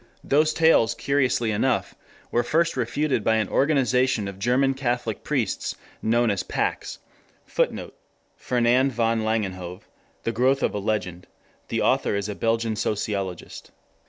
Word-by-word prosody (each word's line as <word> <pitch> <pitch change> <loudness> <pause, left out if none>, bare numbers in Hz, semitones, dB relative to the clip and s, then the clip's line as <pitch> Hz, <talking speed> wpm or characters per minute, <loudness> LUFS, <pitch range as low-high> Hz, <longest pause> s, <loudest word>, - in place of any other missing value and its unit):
Those 155 +2 +3
tales 155 -9 +4
curiously 130 -4 +1
enough 105 -2 0 0.4
were 120 - +2
first 165 +8 +1
refuted 130 0 0
by 110 - +3
an 110 -1 +1
organization 130 -6 +2
of 100 -1 -8
German 125 +5 +2
Catholic 120 -4 -2
priests 130 -9 -1 0.3
known 115 0 +2
as 100 - -1
Pax. - - -2 0.5
[Footnote: - - -2 0.4
Fernand 125 +2 +2
van 115 0 +1
Langenhove, 95 -5 -2 0.4
The 115 - -1
Growth 130 +4 +2
of - - +1
a 105 - -2
Legend. 95 -4 -3 0.4
The - - -1
author - - +2
is 100 0 -2
a 105 - -3
Belgian 115 +1 0
sociologist. 100 -4 -3
115 Hz, 135 wpm, -24 LUFS, 105-130 Hz, 0.5 s, tales